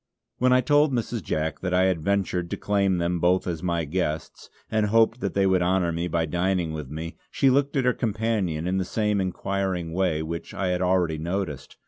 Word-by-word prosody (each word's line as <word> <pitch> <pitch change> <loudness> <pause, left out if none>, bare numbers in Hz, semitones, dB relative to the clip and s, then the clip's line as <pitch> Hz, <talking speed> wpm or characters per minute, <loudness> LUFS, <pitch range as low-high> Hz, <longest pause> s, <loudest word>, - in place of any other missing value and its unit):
When 125 +1 +3
I 130 0 +5
told 145 +3 +3
Mrs. 120 -2 -2
Jack 80 -1 -2
that 90 -1 -1
I 90 - +4
had 95 -4 +1
ventured 90 -1 0
to - - -3
claim 100 -2 +1
them 85 0 0
both 90 +2 +2
as 85 -3 -3
my 85 -2 -1
guests, 80 -1 -3 0.2
and 110 -1 +2
hoped 115 +2 +3
that 100 - -3
they 100 -1 +3
would 95 -1 +3
honour 90 -1 +2
me 85 +1 -2
by 85 -1 0
dining 90 0 0
with 75 -4 -6
me, 80 +3 -6
she 135 - +3
looked 140 +2 +1
at 130 - +1
her 125 - +4
companion 105 -8 -1
in 95 +1 0
the - - 0
same 105 +1 0
inquiring 95 -2 -2
way 85 -4 0
which 85 +1 -6
I 95 -2 -1
had 90 0 0
already 90 -4 +1
noticed. 85 -4 -4
90 Hz, 210 wpm, -25 LUFS, 85-100 Hz, 0.2 s, I